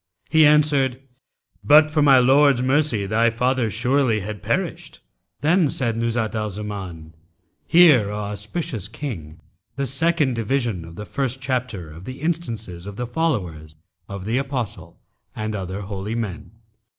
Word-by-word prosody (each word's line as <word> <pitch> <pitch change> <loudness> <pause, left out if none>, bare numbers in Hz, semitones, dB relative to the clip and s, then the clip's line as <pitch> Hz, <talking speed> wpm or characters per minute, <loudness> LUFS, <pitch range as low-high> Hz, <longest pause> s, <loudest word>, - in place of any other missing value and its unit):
He 160 -1 +6
answered, 145 -4 +3 0.6
'But 155 +1 +6
for 155 -1 +2
my 140 -2 +6
Lord's 135 0 +4
mercy 130 -6 +2
thy 115 +4 +2
father 125 0 0
surely 120 0 +1
had 105 0 -6
perished.' - - -3 0.4
Then 160 +1 +3
said 120 -4 -1
Nuzhat 115 -1 -1
al 110 -1 -2
Zaman, 95 -6 -7 0.5
"Hear, 150 - +6
O 105 - -4
auspicious 105 - -4
King, 105 - -7 0.4
the 140 0 -2
second 150 +1 +1
division 115 -6 -2
of 85 0 -12
the 105 - -7
first 135 +2 -3
chapter 125 - -3
of 85 +4 -12
the 130 +1 -8
instances 115 - -3
of 100 - -7
the 125 - -3
followers 95 - -2 0.3
of 100 -1 -7
the 115 +4 0
Apostle 120 - -5 0.4
and 110 0 -3
other 95 0 -4
holy 100 +2 -5
men. 110 -6 -5
115 Hz, 145 wpm, -22 LUFS, 100-140 Hz, 0.6 s, He